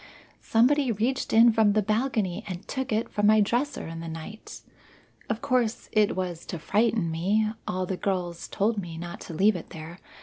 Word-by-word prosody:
Somebody 255 +3 +3
reached 240 +6 -1
in 230 +1 +7
from 215 -2 +4
the 215 0 +2
balcony 215 -3 0
and 180 -2 -7
took 265 -2 -3
it 220 +2 0
from 205 0 +1
my 215 0 +6
dresser 245 +7 0
in 165 0 -6
the 165 - -6
night. 165 +7 -8 0.7
Of 220 0 -2
course, 245 -3 0
it 215 -1 +3
was 180 -3 -3
to 175 - -4
frighten 205 +1 +1
me; 205 +7 +1 0.2
all 185 0 -1
of 180 - -5
the 190 - -2
girls 180 -4 -2
told 210 +2 0
me 170 -4 -6
not 170 +1 -7
to 165 - -8
leave 205 +5 +4
it 175 - -7
there. 160 +3 -9
205 Hz, 195 wpm, -27 LUFS, 175-225 Hz, 0.7 s, in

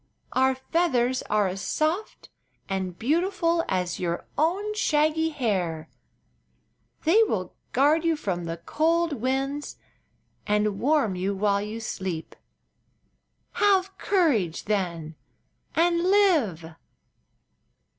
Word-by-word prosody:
Our 260 0 +3
feathers 260 -3 0
are 210 -2 +2
as 190 +1 -4
soft 320 - -2 0.4
and 190 -2 -3
beautiful 335 - +1
as 180 -1 -1
your 175 -1 -2
own 380 +8 0
shaggy 315 -4 +1
hair. 185 - -2 1.1
They 350 +8 +5
will 190 - -1 0.2
guard 295 +5 +3
you 330 -1 +2
from 180 - -3
the 165 0 -4
cold 325 - +1
winds 270 +3 -2 0.7
and 210 -1 +1
warm 275 -8 +2
you 190 +2 -1
while 200 0 +1
you 210 +2 -5
sleep. 185 -7 -5 1.2
Have 390 -1 +2
courage, 270 - +1
then, 175 -6 -2 0.6
and 340 +1 +3
live!" 315 - +2
260 Hz, 105 wpm, -26 LUFS, -, 1.2 s, They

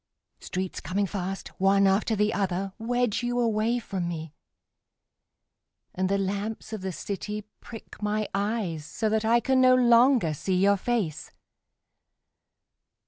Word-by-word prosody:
Streets 185 0 -4
coming 200 +2 -1
fast, 195 0 -4
One 195 +1 +4
after 195 +3 +2
the 210 +1 +1
other, 195 -1 -1
Wedge 245 0 0
you 245 0 -1
away 230 0 +1
from 195 -6 -3
me, 160 -3 -5 1.6
And 185 0 -1
the 200 - +2
lamps 200 +3 -3
of 215 - -4
the 190 0 -3
city 210 +3 -5 0.2
prick 225 -2 -11
my 210 0 -1
eyes 200 -6 -1
So 220 +8 -2
that 220 0 0
I 235 +2 +4
can 260 +2 +2
no 255 0 +6
longer 240 - +4
see 185 +5 -2
your 200 +2 +4
face. 200 -7 -2
205 Hz, 140 wpm, -27 LUFS, 190-230 Hz, 1.6 s, no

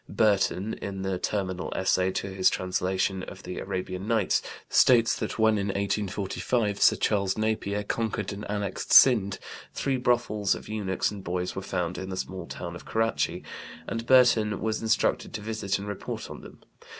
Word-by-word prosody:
Burton 100 0 +1
in 95 -1 -5
the 95 -1 -2
"Terminal 95 -3 -2
Essay" 95 0 +2
to 95 0 -3
his 95 -1 +4
translation 95 +1 -1
of - - -9
the 90 - -5
Arabian 95 0 -4
Nights, 110 -4 +2 0.3
states 115 -3 +5
that - - -4
when 110 -1 +3
in 100 - -1
1845 100 +2 -1
Sir - - +6
Charles 100 -2 0
Napier 110 -2 -1
conquered 110 0 -2
and 100 +1 -7
annexed 100 -2 -3
Sind 100 -7 +7 0.4
three 135 -2 0
brothels 120 -5 +1
of - - -10
eunuchs 105 -3 -1
and 100 -2 -8
boys 90 0 -3
were 95 - -3
found 90 -2 -3
in 95 +1 -6
the 95 - -4
small 95 -3 -5
town 85 -1 -6
of 85 - -10
Karachi, 115 0 -1 0.4
and 115 0 -4
Burton 115 -5 +5
was 110 +1 -1
instructed 110 -1 0
to 110 - -4
visit 105 -2 -2
and 100 +1 -7
report 100 -1 -5
on - - -8
them. - - -14
100 Hz, 170 wpm, -27 LUFS, 95-110 Hz, 0.4 s, Sind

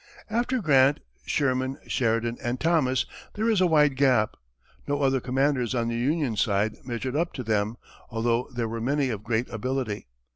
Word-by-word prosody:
After 240 +1 0
Grant, 140 -2 +5 0.3
Sherman, 130 -1 0
Sheridan 115 0 0
and 120 +1 -2
Thomas, 155 -6 +2 0.3
there 215 +2 0
is 215 -5 +3
a 185 - +5
wide 150 -4 +4
gap. 130 -6 +3 0.5
No 145 0 0
other 135 -1 +3
commanders 130 -1 +1
on 115 -1 0
the 115 - -2
Union 135 0 0
side 105 +1 +1
measured 125 +1 -4
up 170 +3 0
to 130 - -5
them, 110 0 0 0.3
although 115 +2 0
there 120 -2 -2
were 115 +1 -4
many 140 +2 +1
of 110 -4 -3
great 115 +2 0
ability. 115 - -3
130 Hz, 170 wpm, -26 LUFS, 115-145 Hz, 0.5 s, Grant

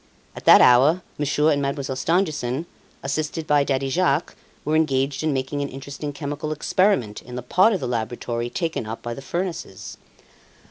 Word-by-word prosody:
At - - -10
that - - +9
hour 140 +9 +5 0.2
Monsieur 150 +2 +2
and 145 -1 +1
Mademoiselle 140 -1 -2
Stangerson, 155 -3 0 0.4
assisted 155 +3 -2
by 145 -1 +3
Daddy 135 -1 -1
Jacques, 160 +1 +1 0.3
were 155 - +1
engaged 140 -3 +1
in 155 -1 0
making 135 +1 -2
an 140 - -3
interesting 140 +2 -6
chemical 145 +2 -5
experiment 155 - +1
in 125 - -10
the 125 - -5
part 185 - +4
of 195 - 0
the 130 - -3
laboratory 120 0 -3
taken 165 - -3
up 110 +1 -6
by 120 - -4
the 135 - -8
furnaces. 170 - -5
140 Hz, 170 wpm, -23 LUFS, 130-155 Hz, 0.4 s, that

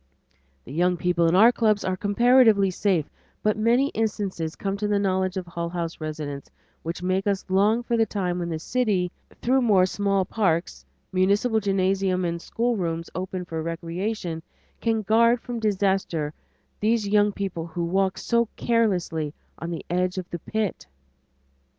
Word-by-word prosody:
The 130 - -9
young 180 +3 +2
people 170 -1 +2
in 165 - +3
our 225 +5 +7
clubs 215 -4 +1
are 185 - 0
comparatively 210 0 +4
safe, 180 -5 +1 0.4
but 215 0 +2
many 235 +6 +3
instances 200 - -2
come 195 -1 -2
to 210 +1 -1
the 205 0 +2
knowledge 190 -1 0
of 185 - -3
Hull 170 0 -4
House 170 -2 -4
residents 150 -3 -5 0.3
which 170 +2 -5
make 185 +2 0
us 200 -1 0
long 210 +5 +3
for 240 0 0
the 225 -1 +3
time 180 -3 -2
when 170 -1 -3
the 160 - -2
city, 195 -2 0 0.3
through 260 +2 +3
more 200 -6 +4
small 195 0 0
parks, 180 -6 -1 0.3
municipal 200 +5 +2
gymnasiums, 190 -2 +1
and 170 0 -2
schoolrooms 180 -9 -2
open 185 0 -4
for 165 -2 -4
recreation, 170 +2 -3 0.4
can 225 -2 0
guard 230 +3 +4
from 240 -1 -5
disaster 190 -7 0 0.5
these 215 0 +1
young 205 0 +3
people 185 -5 -4
who 170 +1 -3
walk 190 +2 +1
so 235 -1 +1
carelessly 180 -10 0 0.2
on 170 - -5
the 170 - -5
edge 180 +1 0
of 185 -2 -4
the 175 - -4
pit. 210 - -3
190 Hz, 160 wpm, -25 LUFS, 170-215 Hz, 0.5 s, our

